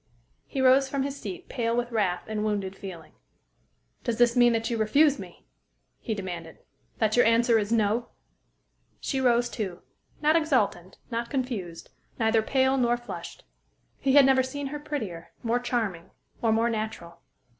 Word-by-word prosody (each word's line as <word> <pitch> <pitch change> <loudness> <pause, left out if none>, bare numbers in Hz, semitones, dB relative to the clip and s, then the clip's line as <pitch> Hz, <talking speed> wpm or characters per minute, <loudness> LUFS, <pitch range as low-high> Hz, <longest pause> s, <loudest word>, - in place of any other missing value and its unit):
He 270 - -3
rose 265 +1 +5
from 275 0 -1
his 280 0 -3
seat 360 +5 -7
pale 230 -2 -1
with 245 0 -1
wrath 195 -6 0
and 215 -1 -2
wounded 200 -3 -2
feeling. 185 -5 -9 0.9
"Does 235 -3 -1
this 240 0 +4
mean 240 -1 +6
that 225 0 0
you 230 - 0
refuse 285 +7 +4
me?" - - -11 0.5
he 220 - -3
demanded, 175 -5 -6 0.4
"that 215 -1 +1
your 245 - +6
answer 230 0 +4
is 210 +1 -3
'no'?" 225 +1 +1 0.9
She 270 -2 -2
rose, 240 -1 +3
too 195 -7 -5 0.4
not 305 +1 +3
exultant, 250 - +1
not 235 0 -2
confused, 235 - -4 0.3
neither 225 0 +3
pale 265 +3 +2
nor 240 -1 +2
flushed. 240 - -8 0.6
He 270 -1 +1
had 285 -1 +8
never 265 -1 +5
seen 275 +2 -4
her 295 - -4
prettier, 210 - -5
more 235 +1 +1
charming, 225 -9 -2 0.3
or 225 - +2
more 225 +1 +2
natural. 215 -6 -5
235 Hz, 160 wpm, -27 LUFS, 210-260 Hz, 0.9 s, had